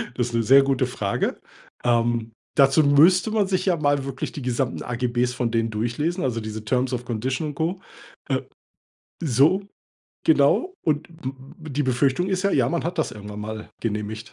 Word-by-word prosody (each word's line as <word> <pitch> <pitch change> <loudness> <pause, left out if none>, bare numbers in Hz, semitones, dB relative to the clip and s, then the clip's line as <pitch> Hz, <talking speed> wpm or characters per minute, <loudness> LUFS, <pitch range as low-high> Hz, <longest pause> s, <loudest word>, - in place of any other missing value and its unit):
das 120 -1 0
ist 120 - -8
'ne 115 0 +1
sehr 135 +5 +7
gute 135 -2 +1
Frage. 100 -5 -2 0.4
Ähm, 120 -1 +1 0.2
dazu 140 +3 +5
müsste 165 +8 +5
man 215 -3 +2
sich 185 -1 0
ja 180 - +4
mal 145 -2 +1
wirklich 135 -1 -4
die 145 - -7
gesamten 125 0 -1
AGBs 120 0 0
von 125 -1 -2
denen 115 0 +1
durchlesen, 120 - -2
also 115 -3 -1
diese 110 0 -6
terms 125 +3 0
of 125 0 -3
Condition 130 +6 -2
und 145 - -8
Co. 170 +5 -1 1.4
So, 155 - +3 0.6
genau 160 - +3
und 150 -1 0
d 140 -1 -9
die 145 +3 0
Befürchtung 135 +6 +1
ist 185 -1 0
ja, 200 - +3
ja, 125 -3 +3
man 170 +4 -1
hat 170 +1 -3
das 160 - 0
irgendwann 105 0 -8
mal 110 +1 -6
genehmigt. 110 0 -4
130 Hz, 175 wpm, -24 LUFS, 115-155 Hz, 1.4 s, sehr